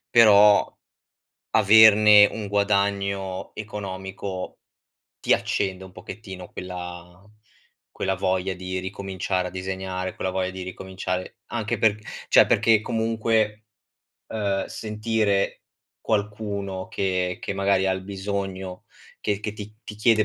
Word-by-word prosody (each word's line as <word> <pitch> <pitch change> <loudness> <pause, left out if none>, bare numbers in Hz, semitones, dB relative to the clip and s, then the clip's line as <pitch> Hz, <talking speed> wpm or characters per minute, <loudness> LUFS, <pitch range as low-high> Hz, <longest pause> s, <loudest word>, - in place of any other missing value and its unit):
però 105 -3 +7 0.8
averne 105 0 +8
un 105 0 -5
guadagno 100 -1 0
economico, 95 -2 -6 0.6
ti - - -1
accende 95 -1 -1
un 95 - -14
pochettino 95 -3 -9
quella 90 0 -8 0.7
quella 95 0 -1
voglia 95 0 -1
di 95 0 -4
ricominciare 95 -1 -3
a - - -16
disegnare, 95 0 -4
quella 95 - -2
voglia 95 0 -1
di 95 0 -7
ricominciare, 95 0 -5
anche 115 0 -2
perch 105 -1 +2 0.3
cioè - - +7
perché 110 -2 +4
comunque, 110 -1 0 0.6
uhm, 100 -3 -1
sentire 105 -2 -1 0.4
qualcuno 100 -3 -3
che 90 -2 -1
che - - -3
magari 100 -1 +2
ha 95 - +2
il 95 0 -4
bisogno, 95 -1 -5 0.4
che 105 -1 -1
che 105 0 -4
ti 105 0 -9
ti 105 - -8
chiede 110 0 +3
100 Hz, 115 wpm, -24 LUFS, 95-105 Hz, 0.8 s, averne